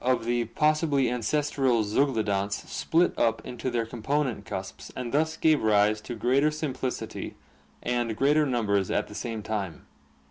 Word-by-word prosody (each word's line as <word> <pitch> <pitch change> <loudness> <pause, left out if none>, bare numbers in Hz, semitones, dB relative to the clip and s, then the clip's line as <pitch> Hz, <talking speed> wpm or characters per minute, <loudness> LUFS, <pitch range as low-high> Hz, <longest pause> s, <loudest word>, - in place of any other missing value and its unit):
of 125 -2 +1
the 120 0 +1
possibly 150 0 +2
ancestral 130 -1 +1
zeuglodonts 105 -4 0
split 170 +2 +1
up 115 -1 +2
into 125 +1 -4
their 120 -2 0
component 125 0 -1
cusps 75 -8 -6
and 125 -2 -4
thus 160 +2 +1
gave 155 -2 +3
rise 105 0 +3
to 120 - -6
greater 130 +6 +3
simplicity 140 -4 -4 0.5
and 120 -2 -1
greater 150 +2 +3
numbers 100 -6 +1
at - - 0
the - - -11
same 115 -3 -4
time. 100 -6 -4
120 Hz, 145 wpm, -27 LUFS, 110-140 Hz, 0.5 s, gave